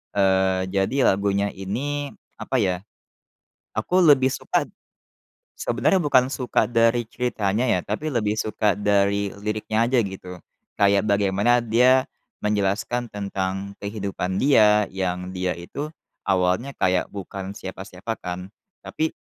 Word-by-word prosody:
Eee, 95 -1 +2
jadi 105 +8 +2
lagunya 100 +1 0
ini, 140 +9 -4 0.2
apa - - -4
ya, 90 -4 +1 1.0
aku 180 - +1
lebih 135 -4 +6
suka, - - 0 0.9
sebenarnya 195 - +1
bukan 130 -3 +4
suka 125 -4 0
dari 115 0 +3
ceritanya 115 -2 -1
ya, 105 -7 +2
tapi 130 +10 -3
lebih 110 -3 0
suka 105 -1 +1
dari 100 -1 +1
liriknya 110 +2 0
aja, 130 +1 +2
gitu. 95 -3 -7 0.4
Kayak 100 +1 +3
bagaimana 100 +4 +2
dia 125 +3 +4 0.4
menjelaskan 105 +4 0
tentang 100 -1 -4
kehidupan 100 -2 -3
dia 105 -6 +5
yang 90 -1 -3
dia 90 -1 -1
itu 115 +12 -6 0.4
awalnya 95 +8 +1
kayak 90 -1 +1
bukan 100 0 -6
siapa-siapa 95 +3 -6
kan, 90 +1 -6 0.3
tapi 160 0 -2
100 Hz, 120 wpm, -23 LUFS, 95-120 Hz, 1.0 s, lebih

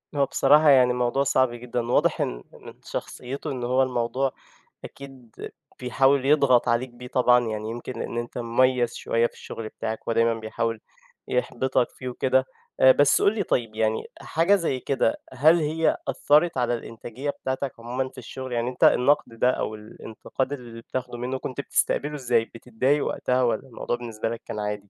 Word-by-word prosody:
هو 140 - +3
بصراحة 150 +3 +4
يعني، 125 -3 +6
موضوع 125 +2 +1
صعب 130 -2 +2
جدًا 120 0 -4
واضح - - +2
إن - - -3
من - - -12
شخصيته، 140 +4 -5
إن 125 -2 -4
هو 130 +2 +2
الموضوع 125 +1 -1 0.5
أكيد 135 -4 -12 0.5
بيحاول 135 +2 +2
يضغط 140 -4 +4
عليك 120 +2 +1
بيه. 120 +1 -11
طبعًا 125 -1 +3
يعني 110 0 -4
يمكن 120 +2 -6
لإن 120 - -4
أنت 120 +1 -5
مُميز 120 +1 +1
شويّة 115 +1 +1
في - - -24
الشُغل 110 -1 -8
بِتاعك 110 0 -6
ودايمًا 115 0 +2
بيحاول 115 0 -3 0.5
يحبطك 125 0 0
فيه 130 -1 -7
وكده، 130 +1 +1 0.3
آآ 130 - +8
بس 140 +1 +4
قُل 205 - +3
لي 205 - 0
طيب 115 -8 -1
يعني 110 0 0 0.2
حاجة 170 +5 +2
زي 165 -9 -1
كده، 135 -4 0 0.2
هل 155 +6 +5
هي 160 +1 +1
أثّرت 150 +2 +2
على 120 -1 +1
الإنتاجية 120 +4 -6
بتاعتك 130 -1 -3
عمومًا 125 +3 -3
في 130 - -22
الشغل 130 +1 -7
يعني 120 +1 0
أنت 125 - -4
النقد 125 -3 +3
ده 125 - +4
أو 110 - -3
الانتقاد 110 +5 -5
اللي 120 -4 -9
بتاخده 125 0 -5
منه 125 +2 -3
نت 130 +2 -3
بتستقبله 150 +1 0
إزاي 120 -4 +1
بتضايق 125 +5 -1
وقتها، 125 0 0
والّا 120 +2 0
الموضوع 120 -1 -3
بالنسبة 115 -2 -4
لك 115 -1 -5
كان 105 - -5
عادي؟ 105 -1 -4
125 Hz, 170 wpm, -25 LUFS, 115-135 Hz, 0.5 s, آآ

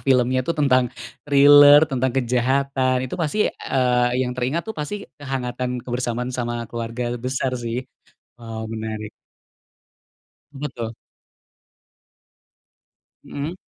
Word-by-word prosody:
filmnya 130 -1 +2
itu 165 +7 -3
tentang 130 -4 +3 0.3
thrille 145 +1 +7
tentang 130 -3 -1
kejahatan 130 +1 +1
itu 130 - -5
pasti, 160 +5 -1
eee, 125 -2 +1 0.2
yang 125 - -3
teringat 130 +7 -2
tuh 220 - -5
pasti 200 +7 -5 0.2
kehangatan, 125 -2 -3
kebersamaan 125 0 -3
sama 120 -1 -3
keluarga 120 +1 -4
besar 130 +1 -2
sih, 120 +2 -3 0.5
waw 110 -2 -7
menarik. 110 -1 -5 1.4
Betul. 120 -5 -5 2.3
Mhm. 150 +5 -5
125 Hz, 100 wpm, -22 LUFS, 120-140 Hz, 2.3 s, thrille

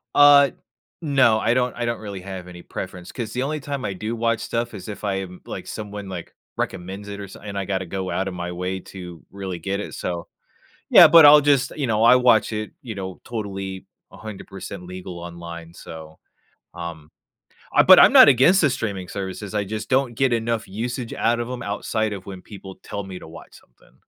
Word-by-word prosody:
Uh, 145 -1 +8 0.5
no, 135 -8 +4
I 115 +1 +2
don’t 125 0 +1
I 120 - -3
don’t 120 -1 -2
really 100 -3 -7
have 95 -1 -8
any 90 -1 -10
preference, 90 -1 -7
'cause 115 -4 -5
the 125 +1 -1
only 150 +2 -2
time 140 -2 -5
I 95 - -2
do 110 +5 -4
watch 115 0 0
stuff 120 0 -3
is 100 +1 -9
if 105 - -8
I 100 -2 0
am 90 -1 -11
like, - - -7
someone, 105 -2 -7
like, 90 -3 -7 0.2
recommends 95 +3 -4
it, 100 0 -7
or 100 - -7
so 95 - -12
and 100 -1 -7
I 100 - -2
gotta 95 -1 -2
go 95 +1 -4
outta 95 0 -2
my 90 0 -5
way 90 +2 -3
to 90 -3 -9
really 95 -3 -6
get 95 +3 -3
it, 105 - -6
so 85 -1 -4 0.6
Yeah, - - +10
but 165 -2 +8
I’ll 150 +1 +9
just 135 -1 0
you 140 -4 -1
know, 110 0 +1
I 120 +2 +8
watch 125 -4 +4
it, 105 0 -3
you 115 -5 -7
know, 95 -1 -4 0.2
totally 95 -4 -5 0.3
100% 100 -3 -9
legal 90 -1 -8
online, 85 -1 -9
so 80 -2 -11 0.6
Um, 85 -3 -8 0.7
uh, - - +8
but - - +9
I’m - - +8
not - - +10
against 170 +11 +5
the 150 -5 +3
streaming 100 -6 -4
services, 100 +1 -6
I 105 -1 0
just 110 +2 -5
don’t 130 -2 +2
get 130 -2 +3
enough 115 -1 -1 0.2
usage 125 -1 -5 0.2
out 120 0 +2
of 120 - -6
'em, 125 -1 -5
outside 110 0 -2
of 95 -2 -7
when 95 -2 -8
people 95 -1 -9 0.2
tell 100 - -4
me 95 -1 -8
to - - -12
watch - - -14
something. 60 - -27
100 Hz, 210 wpm, -22 LUFS, 95-120 Hz, 0.7 s, Yeah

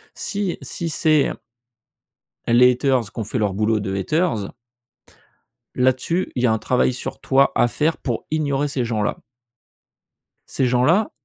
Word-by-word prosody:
Si 200 -3 -3
si 170 - -5
c'est 155 -2 +2 1.2
les 125 +2 +6
haters 125 -4 0
qu'ont 115 - -4
fait 115 - -3
leur 105 -3 0
boulot 110 +1 +1
de 95 -1 -3
haters 115 - -1 1.2
là-dessus, 130 +8 0
il 125 - -1
y - - +6
a 110 - +3
un 110 - 0
travail 125 +3 +1
sur 125 - -6
toi 135 +1 +3
à 120 - +3
faire 155 +6 0
pour 120 -5 -3
ignorer 145 -2 0
ces 135 -3 -2
gens-là. 110 -3 -1 1.3
Ces 130 - 0
gens-là, 135 - +2
125 Hz, 145 wpm, -21 LUFS, 115-155 Hz, 1.3 s, les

